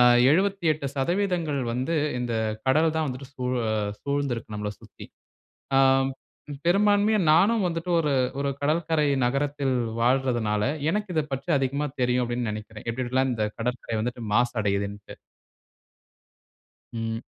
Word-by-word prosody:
அ - - +8 0.3
78% 165 -2 0
வந்து 130 +7 -1 0.2
இந்த 120 -1 -2 0.3
கடல் 155 +4 +3
தான் 160 -1 +1
வந்துட்டு 130 +1 -6
சூழ 125 0 -2 0.5
சூழ்ந்து 140 -2 -1
இருக்கு 110 -1 -8
நம்மள 105 0 -3
சுத்தி. - - -13 0.7
ஆ - - +5 0.9
பெரும்பான்மையா 205 +3 +3
நானும் 200 +7 +4
வந்துட்டு 165 +1 -4
ஒரு, 150 -3 +1 0.3
ஒரு 140 0 0
கடற்கரை 155 0 +1 0.2
நகரத்தில் 140 +1 0 0.3
வாழ்றதுனால, 120 -4 +1 0.3
எனக்கு 210 0 -2
இத 155 - +3
பற்றி 135 +6 -5
அதிகமா 140 +2 -1
தெரியும், 125 0 +2
அப்டின்னு 120 -1 -2
நெனைக்கிறேன். 110 0 -8
எப்டி 130 +2 -3
எப்டிலாம் 130 +1 +1
இந்த 110 -2 -1 0.2
கடற்கரை 120 -1 -3
வந்துட்டு 120 +2 -4
மாசடையுதுன்ட்டு. 105 -3 -1 1.8
ம். 115 0 -3
135 Hz, 120 wpm, -26 LUFS, 120-160 Hz, 1.8 s, அ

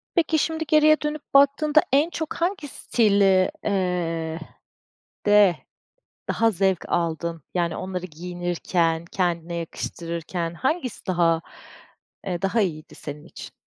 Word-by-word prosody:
Peki, 325 -2 +2
şimdi 320 +1 -1
geriye 310 0 +5
dönüp 300 0 -3
baktığında 285 +2 +5
en 295 +4 +4
çok 320 -2 -4
hangi 345 -3 -2
stil 215 -6 +1 0.4
eee, 170 -4 -1 0.9
de 205 -4 +6 0.7
daha 225 0 +3
zevk 190 -2 0
aldın? 165 -1 -1
Yani, 170 -2 0
onları 185 -1 -4
giyinirken, 175 0 -1
kendine 170 -2 -2
yakıştırırken 170 0 -4
hangisi 260 - -2
daha, 170 -2 +2 0.9
eee, 175 -2 -2
daha 200 +4 +1
iyiydi 155 -5 -3
senin 150 0 -8
için? - - -11
180 Hz, 115 wpm, -24 LUFS, 170-275 Hz, 0.9 s, de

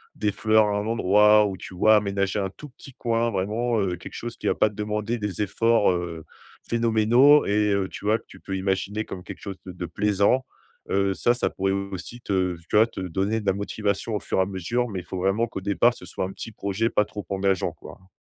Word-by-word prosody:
des 105 -1 0
fleurs 110 +2 +3
à 105 0 0
un 105 - -3
endroit 105 -1 +5
ou, 95 -2 -3
tu 90 - -10
vois, 110 +4 +5
aménager 100 -1 0
un 95 -1 -1
tout 150 +9 -12
petit 135 +1 -14
coin 115 -1 0
vraiment, 110 +4 -1
heu, 95 -3 0
quelque - - -10
chose 120 0 -6
qui - - -5
va - - +2
pas 110 - +3
te 105 - -15
demander 105 +2 -2
des 105 -1 -2
efforts, 115 +1 +3
heu, 85 -2 -4 0.4
phénoménaux 115 +5 +4
et 105 0 +2
heu, 95 -1 0
tu - - -10
vois, 110 +2 +3
que 110 - -20
tu - - -14
peux 95 -1 -4
imaginer 95 +3 -1
comme 90 -1 -8
quelque - - -9
chose 100 -2 -6
de - - -5
de 90 -1 -5
plaisant, 105 +8 +1 0.5
heu, 100 0 +1
ça, 120 +5 +2
ça - - -1
pourrait 95 0 -1
aussi 100 +3 -5
te 95 -4 0
tu - - -2
vois, 110 +2 +6
te 115 - -9
donner 95 +5 -1
de - - -11
la 95 - +3
motivation 100 +2 -2
au - - 0
fur - - -2
et - - +5
à - - +2
mesure, 110 +6 -2
mais 95 -4 -4
il - - -18
faut 95 +1 -5
vraiment 95 +5 +1
qu'au 105 -4 -7
départ 100 +5 +3
ce - - -12
soit - - -3
un 95 - -5
petit 115 - -8
projet 100 +2 -1
pas 105 - +2
trop 105 0 -7
engageant, 95 -1 0
quoi, - - -13
hein. 95 - -23
105 Hz, 245 wpm, -25 LUFS, 95-110 Hz, 0.5 s, vois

